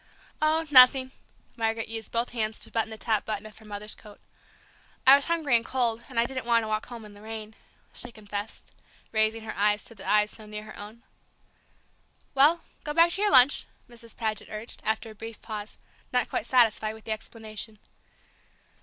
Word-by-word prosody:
"Oh, 315 +1 +2
nothing!" 260 0 +8 0.4
Margaret 225 -1 -1
used 225 -1 -6
both 235 +1 0
hands 220 -2 -1
to - - -6
button 225 -1 0
the 220 - -7
top 220 -2 0
button 215 -1 -4
of 215 -1 -11
her 220 - -16
mother's 210 0 -4
coat. 210 -2 -14 0.9
"I 265 - +10
was 280 - +1
hungry 320 -7 +2
and 230 - +3
cold, 235 -3 0
and 245 -3 -1
I 230 - +4
didn't 255 -1 -4
want 230 -1 +4
to - - -4
walk 215 0 -2
home 235 -3 -9
in 210 - -12
the 205 - -15
rain!" 220 0 -7 0.4
she 245 - -3
confessed, 205 -1 -7 0.4
raising 220 +1 +2
her 220 - -6
eyes 210 +1 +2
to - - -3
the 195 -3 -7
eyes 210 0 +4
so 215 -1 -10
near 210 0 -6
her 215 - -11
own. 215 +3 -10 1.3
"Well, 300 +5 +5 0.2
go 295 0 -4
back 335 +1 +6
to 390 - -3
your 420 - +4
lunch," 260 -1 +6 0.2
Mrs. 235 -1 -13
Paget 220 -2 -2
urged, 215 +2 -7
after 220 +1 -1
a - - -11
brief 225 +1 -9
pause, 215 -2 -6 0.3
not 250 -2 +1
quite 225 - -2
satisfied 220 -3 +3
with 220 - -14
the 220 - -6
explanation. 220 0 -6
225 Hz, 195 wpm, -27 LUFS, 215-245 Hz, 1.3 s, I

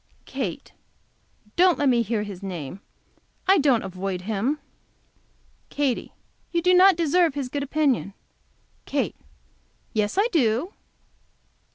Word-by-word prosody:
Kate - - -5 0.8
Don't 360 -1 +5
let 290 - +1
me 245 -2 +4
hear 220 -1 -1
his 200 -3 -8
name. 180 -3 -6 0.7
I 385 0 +6
don't 275 -6 +3
avoid 185 -1 -4
him. 220 +8 -1 1.1
Katy. 280 -4 -1 0.4
You 340 -1 0
do 365 +1 +4
not 370 +1 +7
deserve 335 -1 +2
his 275 -3 -3
good 285 +2 -3
opinion. 280 -8 0 0.7
Kate. - - -1 0.8
Yes, 210 - 0
I 410 +3 +4
do. 265 - +1
265 Hz, 120 wpm, -24 LUFS, 205-330 Hz, 1.1 s, not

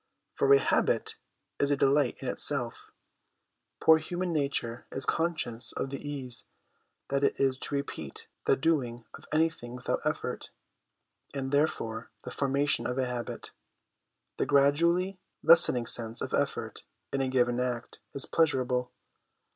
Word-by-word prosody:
For 435 -2 +2
a 420 - +9
habit - - +1 0.4
is 140 - +2
a 145 - +2
delight 140 -1 +2
in - - -4
itself; - - 0 0.9
poor 160 0 +6
human 175 +2 -3
nature 140 -6 -1
is 135 - -2
conscious 155 -8 -1
of 135 - -3
the 140 - -5
ease 135 -4 -4 0.6
that 140 0 0
it - - +1
is 135 -1 +1
to 145 - -3
repeat 110 - -5 0.2
the - - +4
doing 125 -6 0
of - - -12
anything 155 -6 0
without 125 - -2
effort; - - -3 0.9
and, 135 -1 -3
therefore, 115 -6 0
the - - -7
formation 140 +1 +2
of 125 - -3
a 130 - +1
habit, 125 -1 -5 0.9
the - - 0
gradually 170 +7 +3 0.2
lessening 125 -7 +6
sense 115 0 +2
of - - -5
effort - - -1 0.3
in 135 - +1
a 135 - 0
given 125 -2 +1
act, 125 -1 -3 0.2
is 140 - -1
pleasurable. 125 -6 +1
135 Hz, 140 wpm, -29 LUFS, 125-150 Hz, 0.9 s, a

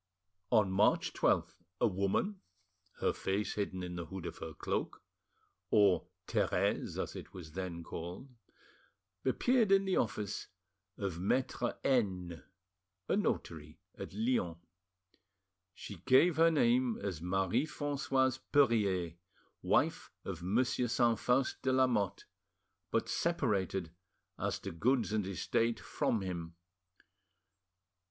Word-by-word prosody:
On 105 -5 +4
March 100 +3 +3
12th, - - +2 0.3
a - - +4
woman, 100 - 0 0.6
her - - +2
face 100 +2 -1
hidden 95 -3 -3
in 90 0 -5
the 85 -1 -5
hood 95 -2 -7
of - - -6
her 80 -1 -7
cloak, - - -3 0.7
or 100 -4 +4 0.2
"Therese," - - 0
as - - -3
it - - -9
was 85 -4 -9
then 85 -1 -5
called, 85 +10 -7 1.0
appeared 225 - +2
in 195 0 +5
the 190 - +1
office 105 -3 -2 0.5
of 95 -4 -3
Maitre 120 +4 0
N——, 95 -10 0 0.7
a - - +2
notary 80 - -2 0.2
at - - -8
Lyons. 105 -6 0 1.2
She 100 - -8
gave 130 - +4
her 165 +1 +6
name 125 -5 +3
as 95 -6 -4
Marie 95 - +1
Francoise 135 -3 0
Perffier, 100 - +3 0.4
wife - - +1 0.2
of 80 - -5
Monsieur 120 +6 +1
Saint 120 -1 +2
Faust 130 +2 +1
de 130 - +1
Lamotte, 125 -7 +1 0.6
but - - 0
separated, 100 - 0 0.5
as - - -1
to - - -6
goods 115 +6 +1
and 105 -3 0
estate, 110 +5 0
from 110 - -1
him. 85 -3 -5
105 Hz, 120 wpm, -33 LUFS, 90-130 Hz, 1.2 s, her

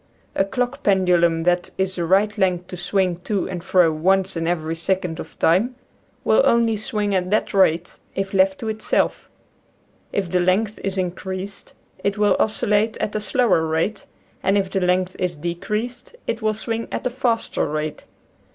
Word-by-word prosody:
A - - +2
clock 250 +7 -2
pendulum 175 -5 +3
that 175 +1 +1
is 190 0 0
the 170 - -1
right 200 +4 +3
length 180 -3 +1
to - - -5
swing 180 0 0
to 200 -1 -1
and 180 -3 -5
fro 180 -3 +4
once 190 +5 +1
in 165 0 -2
every 165 -2 -1
second 175 0 -1
of - - -9
time 205 +10 +2 0.5
will - - +4
only 230 - +3
swing 210 -1 -1
at 185 -1 0
that 215 - 0
rate, 180 -3 +2 0.2
if 195 0 -2
left 190 0 +3
to 225 - -4
itself. 220 0 -1 0.8
If 190 -4 -2
the 180 - +3
length 195 +4 +1
is 195 0 -2
increased 185 +2 -4 0.3
it 200 +1 0
will 210 -1 +3
oscillate 215 0 +1
at 210 - -3
a 215 - 0
slower 205 -4 +2
rate, 165 +6 -1 0.3
and 195 +2 +2
if 195 -1 -1
the 195 - 0
length 180 0 +1
is 180 -2 -1
decreased 210 - -4
it 230 0 -2
will 215 0 +1
swing 225 +1 -3
at - - -4
a 250 - 0
faster 240 -7 0
rate. 155 0 -4
190 Hz, 175 wpm, -22 LUFS, 175-210 Hz, 0.8 s, fro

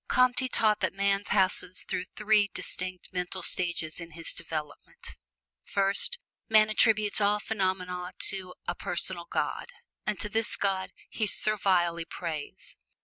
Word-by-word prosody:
Comte 255 0 +4
taught 215 -2 +3
that - - -1
man 200 0 +1
passes 185 -2 +1
through 180 - -3
three 210 -1 +3
distinct 185 0 -2
mental 180 0 -3
stages 170 -3 +2
in 170 -1 -9
his 165 +1 -4
development: 155 -3 -7 0.5
First, 200 - +3 0.3
man 215 -1 +5
attributes 215 -1 +3
all 205 +1 +3
phenomena 185 -3 -2 0.2
to 185 -2 -6
a - - 0
"Personal 175 -1 -1
God," - - -2 0.4
and 210 -2 -1
to 210 - 0
this 220 +1 -1
God 190 -2 -1 0.2
he 215 - -2
servilely 185 -6 +1
prays. 165 -3 -7
190 Hz, 135 wpm, -28 LUFS, 175-210 Hz, 0.5 s, man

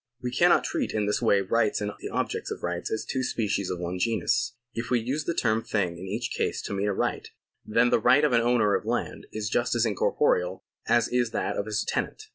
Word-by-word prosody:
We 125 0 -4
cannot - - +4
treat - - -2
in 105 -1 +1
this 105 - 0
way 100 - +4
rights 105 +2 +1
and 105 0 -2
the - - -6
objects - - -2
of - - -6
rights 90 0 -3
as 110 - -2
two 130 - -2
species 105 -6 -1
of 90 - -2
one 90 +1 -4
genus. 115 +2 0 0.2
If 115 +2 -4
we 125 - +3
use 135 +6 -2
the 170 - -1
term 110 -1 +1
thing 90 -5 -1
in 95 - -7
each 110 +5 -3
case - - -1
to - - -4
mean 100 +1 -1
a 100 - +1
right, - - -2 0.3
then 115 +3 +2
the - - +4
right 145 +6 +5
of 150 -4 +3
an 115 - +5
owner 115 -4 +3
of - - 0
land - - -3
is 105 -1 -3
just 120 +3 0
as 120 0 +2
incorporeal 95 -3 +1 0.2
as 120 - +3
is 125 -2 +1
that - - -1
of 100 - -2
his 105 0 -1
tenant. 435 - -2
110 Hz, 240 wpm, -27 LUFS, 100-120 Hz, 0.3 s, right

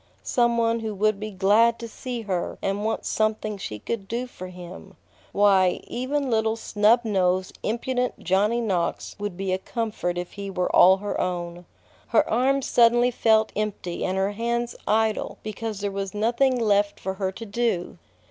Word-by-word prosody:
Some 235 -1 +2
one 230 0 +2
who 220 -2 -4
would 215 0 +1
be 215 +1 -4
glad 210 +4 +3
to 230 - -7
see 245 +1 -6
her 185 -5 -3
and 195 +1 -2
want 220 +1 -2
something 215 -1 -1
she 105 - -5
could 195 - -5
do 235 +4 -2
for 185 -7 -9
him! 180 - -11 0.4
Why, 195 -3 +4
even 275 +3 -2
little 220 0 +1
snub 225 +1 +3
nosed, 185 -3 0
impudent 250 +3 -1
Johnny 205 +6 +1
Knox 185 -7 -2
would 205 -3 -4
be 190 -1 -1
a 185 - 0
comfort 210 -5 -3
if 175 0 -4
he 200 -1 -6
were 180 -2 -1
all 190 +1 +7
her 205 +1 -4
own. 175 -1 -4 0.4
Her 230 - +3
arms 265 +3 +1
suddenly 240 +1 +4
felt 220 -2 +3
empty 205 -4 -3
and 185 +1 -1
her 195 +1 +1
hands 235 +2 -2
idle 220 0 +1
because 215 -1 -5
there 205 -1 -1
was 195 0 -4
nothing 240 +4 +2
left 205 -2 +2
for 190 - -3
her 190 -1 0
to 225 - -8
do. 210 -4 -2
215 Hz, 175 wpm, -25 LUFS, 190-230 Hz, 0.4 s, all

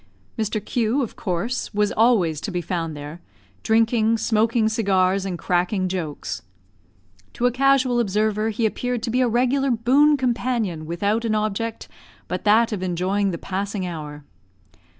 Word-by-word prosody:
Mr 220 -1 -1
Q, 240 +3 0
of 235 - -6
course, 205 +7 -3
was 210 0 +2
always 195 -10 +2
to - - -4
be 180 -2 -2
found 165 -2 -3
there, 145 +4 -8 0.4
drinking, 225 0 +2
smoking 220 0 +2
cigars, 195 -3 +1
and 180 -2 -3
cracking 180 +2 0
jokes. 150 - -4 0.9
To 240 - -1
a 245 - +4
casual 260 -1 +3
observer 215 0 0
he 225 +1 -1
appeared 245 +2 -2
to 230 - -2
be 250 +2 +2
a 250 - +3
regular 255 +4 +1
boon 265 +6 +4
companion 235 - -1
without 200 +7 0
an 220 -2 0
object 215 +2 -2 0.4
but - - -4
that 220 +3 +4
of 205 -4 -3
enjoying 185 +3 0
the 170 - -3
passing 195 +1 -3
hour. 150 -4 -7
215 Hz, 150 wpm, -22 LUFS, 185-235 Hz, 0.9 s, a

